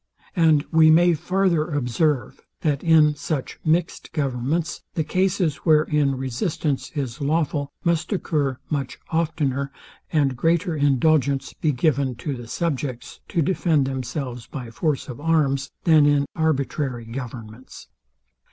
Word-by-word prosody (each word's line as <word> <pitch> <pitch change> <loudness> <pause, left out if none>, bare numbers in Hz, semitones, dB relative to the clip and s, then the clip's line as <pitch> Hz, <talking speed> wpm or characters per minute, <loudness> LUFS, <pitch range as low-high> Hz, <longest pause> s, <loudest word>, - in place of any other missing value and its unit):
And 160 -4 +4
we 160 -1 +6
may 170 +2 +6
farther 180 0 +1
observe, 145 0 0 0.2
that 145 -3 0
in 155 -2 +5
such 145 -1 -4
mixed 165 +2 0
governments, 145 +3 -1
the 160 - +1
cases, 180 -3 0
wherein 150 -3 +2
resistance 135 +3 -2
is 135 -1 -4
lawful, 145 -1 0
must 170 +2 0
occur 150 -9 0
much 140 -4 -3
oftener, 150 -5 -1 0.4
and 140 -4 +2
greater 165 +5 +1
indulgence 140 -1 +2
be 155 - 0
given 135 -2 +1
to 140 +5 -4
the 120 -2 -9
subjects 140 -4 -3
to 170 -3 0
defend 165 -4 +2
themselves 130 -2 -4
by 125 -5 -7
force 150 +3 -1
of 130 +2 -8
arms, 140 -4 +1
than 155 -3 +5
in 145 -1 +3
arbitrary 140 -5 -1
governments. 115 -1 -8
145 Hz, 125 wpm, -23 LUFS, 135-160 Hz, 0.4 s, we